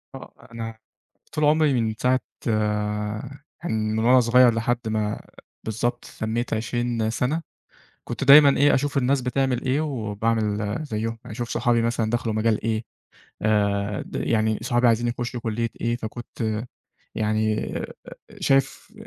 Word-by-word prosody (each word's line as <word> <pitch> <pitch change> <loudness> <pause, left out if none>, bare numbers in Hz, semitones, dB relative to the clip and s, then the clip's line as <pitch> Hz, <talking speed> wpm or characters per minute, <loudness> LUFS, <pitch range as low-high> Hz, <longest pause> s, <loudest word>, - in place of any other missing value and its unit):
آه. 135 - -11 0.2
أنا 115 -1 -6 0.6
طول 155 -1 -1
عُمري 150 -1 +4
من 110 -1 -1
ساعة 130 +1 +3 1.4
يعني 170 - -2
من 110 0 0
وأنا 125 +3 +5
صغير 120 0 +5
لحد 115 +1 -1
ما 110 -1 -1 0.4
بالضبط 120 +3 -2
تمّيت 115 +2 -2
20 115 0 -1
سنة، 125 +8 -1 0.6
كنت - - -4
دايمًا 140 0 +8
إيه، 145 +1 +5
أشوف 140 +1 0
الناس 135 +1 +2
بتعمل 125 0 0
إيه 130 +3 +1
وباعمل 110 -5 -1
زيّهم. 115 -3 -3
أشوف 120 +2 -5
صحابي 120 0 +1
مثلًا 115 -1 0
دخلوا 120 -2 -1
مجال 110 0 +1
إيه؟ 110 0 -1 0.6
آآ 105 -1 +1
د - - -7
يعني 110 -1 +1
صحابي 120 +1 +2
عايزين 120 +1 +2
يخُشّوا 120 0 -3
كُلّية 115 0 -2
إيه؟ 120 0 0
فكنت 110 -1 -4 0.5
يعني 110 0 0
أ - - -4 0.5
شايف 135 +8 +1
115 Hz, 135 wpm, -24 LUFS, 110-125 Hz, 1.4 s, دايمًا